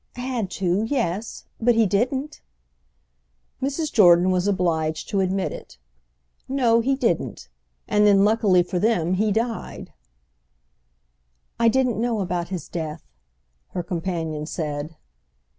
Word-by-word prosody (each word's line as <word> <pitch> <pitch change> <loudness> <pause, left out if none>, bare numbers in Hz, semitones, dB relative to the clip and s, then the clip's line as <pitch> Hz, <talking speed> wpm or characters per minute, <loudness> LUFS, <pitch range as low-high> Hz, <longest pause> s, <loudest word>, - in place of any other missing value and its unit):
"Had 245 -5 -3
to—yes. 205 +2 -2
But 240 +1 +3
he 225 -1 +4
didn't." 255 +9 -1 1.2
Mrs. 285 +3 -2
Jordan 180 -3 +6
was 185 +1 +1
obliged 160 -5 -1
to 200 - 0
admit 190 0 0
it. - - -10 0.7
"No, 245 -4 +3
he 265 +4 +1
didn't. 270 - -2 0.4
And 210 0 +3
then, 200 -1 +5
luckily 205 -4 +3
for 180 +1 -3
them, 180 -5 +1
he 210 +3 +1
died." 225 +2 -3 1.7
"I 230 - +4
didn't 250 -2 +2
know 235 -2 0
about 175 -2 -2
his 180 -5 -5
death," 160 - -5 0.7
her 180 - -2
companion 165 -3 -3
said. 155 -1 -4
195 Hz, 120 wpm, -23 LUFS, 175-230 Hz, 1.7 s, Jordan